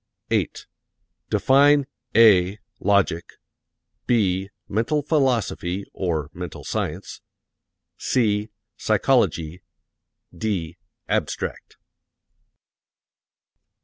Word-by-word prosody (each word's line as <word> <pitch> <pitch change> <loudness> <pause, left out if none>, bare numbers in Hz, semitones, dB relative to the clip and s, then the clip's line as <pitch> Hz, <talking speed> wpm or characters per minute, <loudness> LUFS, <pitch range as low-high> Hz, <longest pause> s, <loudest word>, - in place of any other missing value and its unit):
8. - - -1 0.6
Define 145 +1 +4 0.3
(a) 100 -4 +6 0.2
logic; 100 -4 +1 0.7
(b) 95 -5 +1 0.2
mental 115 +9 0
philosophy 120 - 0
(or 80 -4 -2
mental 90 -2 -7
science); - - -4 0.8
(c) 105 -4 +1 0.3
psychology; 90 - +1 0.7
(d) 90 -6 -3 0.3
abstract. - - -3
100 Hz, 60 wpm, -23 LUFS, 90-120 Hz, 0.8 s, a